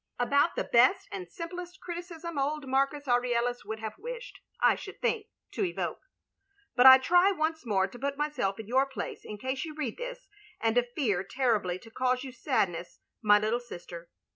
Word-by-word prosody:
* -, -, -43 dB
About 280 Hz, +6 st, +3 dB
the -, -, 0 dB
best 240 Hz, +2 st, +4 dB
and 180 Hz, -3 st, -6 dB
simplest 355 Hz, +1 st, -7 dB
criticism 340 Hz, -3 st, -6 dB
old 290 Hz, +1 st, -1 dB
Marcus 275 Hz, +2 st, 0 dB
Aurelius 245 Hz, 0 st, +1 dB
would 220 Hz, -, -5 dB
have 220 Hz, -1 st, -6 dB
wished, -, -, -7 dB, 0.2 s
I -, -, +5 dB
should 390 Hz, -, -9 dB
think, 430 Hz, -2 st, 0 dB, 0.2 s
to -, -, -2 dB
evoke. 360 Hz, -, -2 dB, 0.8 s
But 250 Hz, 0 st, +8 dB
I 260 Hz, 0 st, +12 dB
try 355 Hz, +8 st, +4 dB
once 320 Hz, -5 st, -2 dB
more 190 Hz, -3 st, +3 dB
to 240 Hz, +5 st, -12 dB
put 280 Hz, +2 st, -2 dB
myself 270 Hz, -10 st, -1 dB
in 220 Hz, -, -6 dB
your 265 Hz, +4 st, +3 dB
place 270 Hz, -, -6 dB
in 210 Hz, -, -7 dB
case 260 Hz, +4 st, -3 dB
you 315 Hz, -2 st, -7 dB
read 290 Hz, -7 st, -3 dB
this, -, -, -6 dB, 0.3 s
and 230 Hz, +2 st, +3 dB
fear 210 Hz, -, +1 dB
terribly 210 Hz, -5 st, 0 dB
to 225 Hz, +4 st, -15 dB
cause 255 Hz, +1 st, 0 dB
you 265 Hz, -, -7 dB
sadness, 185 Hz, -, -1 dB, 0.2 s
my 205 Hz, -2 st, +6 dB
little 215 Hz, +3 st, 0 dB
sister. 175 Hz, -7 st, -10 dB
260 Hz, 185 wpm, -29 LUFS, 220-315 Hz, 0.8 s, I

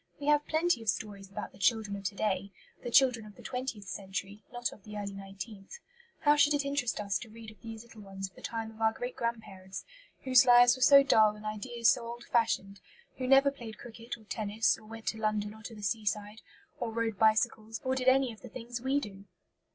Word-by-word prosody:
We 285 Hz, -, -6 dB
have 295 Hz, 0 st, +3 dB
plenty 320 Hz, -5 st, +1 dB
of 225 Hz, -, -2 dB
stories 195 Hz, +1 st, -3 dB
about 195 Hz, -, -6 dB
the 190 Hz, -, -18 dB
children 210 Hz, 0 st, +1 dB
of 200 Hz, -, -7 dB
to 195 Hz, +2 st, -2 dB
day 200 Hz, -1 st, -1 dB, 0.3 s
the 240 Hz, -, -5 dB
children 245 Hz, -2 st, +4 dB
of 210 Hz, -1 st, -13 dB
the -, -, -14 dB
twentieth 250 Hz, -6 st, -4 dB
century, 195 Hz, +2 st, -5 dB
not 245 Hz, 0 st, -2 dB
of -, -, -16 dB
the 210 Hz, -1 st, -8 dB
early 200 Hz, -1 st, -4 dB
nineteenth. 195 Hz, -, -9 dB, 0.4 s
How 295 Hz, 0 st, +5 dB
should 295 Hz, 0 st, +4 dB
it 285 Hz, -1 st, -1 dB
interest 275 Hz, -6 st, -1 dB
us 200 Hz, -3 st, -1 dB
to 235 Hz, -, -10 dB
read 220 Hz, 0 st, -11 dB
of 215 Hz, -, -20 dB
these 225 Hz, -1 st, -8 dB
little 230 Hz, -2 st, -14 dB
ones 195 Hz, -1 st, -6 dB
of 190 Hz, -, -21 dB
the -, -, -14 dB
time 225 Hz, -1 st, -4 dB
of 220 Hz, 0 st, -14 dB
our 220 Hz, 0 st, +3 dB
great 245 Hz, +2 st, -5 dB
grandparents, 210 Hz, -5 st, -5 dB, 0.4 s
whose 255 Hz, -1 st, +6 dB
lives 245 Hz, -1 st, +7 dB
were 260 Hz, -, -10 dB
so 275 Hz, +2 st, +8 dB
dull 220 Hz, -6 st, +5 dB
and 210 Hz, 0 st, -12 dB
ideas 230 Hz, +2 st, +1 dB
so 245 Hz, -, -1 dB
old 235 Hz, 0 st, -7 dB
fashioned; 210 Hz, -5 st, 0 dB, 0.4 s
who 255 Hz, -, -3 dB
never 270 Hz, +1 st, +6 dB
played 230 Hz, -5 st, -9 dB
cricket 230 Hz, 0 st, -8 dB
or 220 Hz, -, -18 dB
tennis, 215 Hz, 0 st, 0 dB
or 215 Hz, -, -16 dB
went 225 Hz, 0 st, -10 dB
to 220 Hz, -, -5 dB
London 210 Hz, -1 st, -1 dB
or 220 Hz, -, -14 dB
to 225 Hz, +1 st, -8 dB
the 210 Hz, -, -10 dB
seaside, 210 Hz, +1 st, -2 dB, 0.4 s
or 230 Hz, -, -2 dB
rode 225 Hz, -2 st, -2 dB
bicycles, 220 Hz, 0 st, +2 dB
or 260 Hz, 0 st, 0 dB
did 260 Hz, -1 st, -2 dB
any 260 Hz, -2 st, +4 dB
of 215 Hz, -, -16 dB
the 250 Hz, -, -10 dB
things 240 Hz, +1 st, -7 dB
we 265 Hz, +3 st, +1 dB
do? 200 Hz, -6 st, -9 dB
225 Hz, 230 wpm, -31 LUFS, 205-245 Hz, 0.4 s, so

